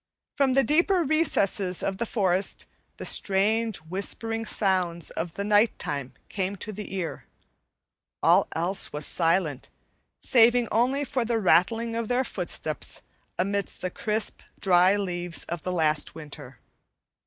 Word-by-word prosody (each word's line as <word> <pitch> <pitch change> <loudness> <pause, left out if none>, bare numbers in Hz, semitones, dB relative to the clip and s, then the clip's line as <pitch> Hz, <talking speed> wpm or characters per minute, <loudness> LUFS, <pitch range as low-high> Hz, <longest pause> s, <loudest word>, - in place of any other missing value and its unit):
From 275 -2 +2
the 270 +1 +4
deeper 340 - +3
recesses 205 - +1
of 195 -1 -2
the 235 - -1
forest 190 -3 +2 0.3
the - - -6
strange 215 +3 +1
whispering 200 +7 -3
sounds 180 -6 +1
of 165 -1 -5
night 205 +2 +3
time 140 -3 -4
came 195 0 -3
to 210 +2 -5
the 205 -1 -7
ear; 175 -4 -4 1.0
all - - +5
else 175 +4 0
was 150 0 -4
silent, 165 -5 0 0.5
saving 240 0 +4
only 255 +6 +2
for 260 -3 -1
the 230 0 0
rattling 225 +4 +2
of 230 -1 -2
their 250 +2 +1
footsteps - - -4 0.3
amid 200 +2 0
the 185 - -4
crisp, 215 +2 -2 0.2
dry 185 +1 +4
leaves 175 -3 -3
of 170 -1 -5
the 185 - -3
last 155 -4 0
winter. 145 -5 -9
195 Hz, 135 wpm, -26 LUFS, 175-230 Hz, 1.0 s, all